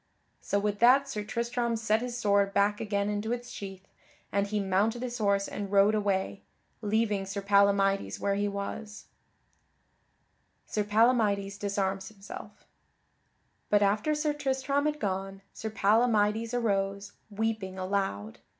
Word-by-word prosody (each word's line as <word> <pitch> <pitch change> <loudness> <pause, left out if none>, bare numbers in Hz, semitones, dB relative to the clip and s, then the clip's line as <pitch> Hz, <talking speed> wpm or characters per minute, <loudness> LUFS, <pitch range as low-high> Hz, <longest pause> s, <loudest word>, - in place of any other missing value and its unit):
So 200 - -1
with 205 0 -1
that 260 +4 +6
Sir 215 -6 -4
Tristram 235 +2 -1
set 220 0 +1
his 245 -1 -4
sword 200 -3 +2
back 205 +1 +2
again 200 -2 -1
into 210 +2 -2
its 245 0 -4
sheath, 195 -1 -8 0.4
and 200 0 +1
he 210 +1 -1
mounted 205 +5 +1
his 245 -1 -4
horse 200 -2 +2
and 200 -1 -5
rode 200 +1 +5
away, 200 -2 -1 0.4
leaving 210 -2 +1
Sir 200 +1 -4
Palamydes 200 0 +3
where 200 - 0
he 205 +1 0
was. 205 +2 -6 1.6
[Sidenote: 210 -1 -2
Sir 205 - -6
Palamydes 205 -4 +3
disarms 195 -1 -1
himself] 200 -2 -11 1.0
But 205 0 +4
after 210 +10 +1
Sir 300 0 0
Tristram 275 0 0
had 300 0 -2
gone, 195 -1 -3
Sir 220 - -5
Palamydes 220 +1 +2
arose, 200 -3 -1 0.2
weeping 210 -3 -2
aloud. 185 - -2
205 Hz, 140 wpm, -29 LUFS, 200-225 Hz, 1.6 s, that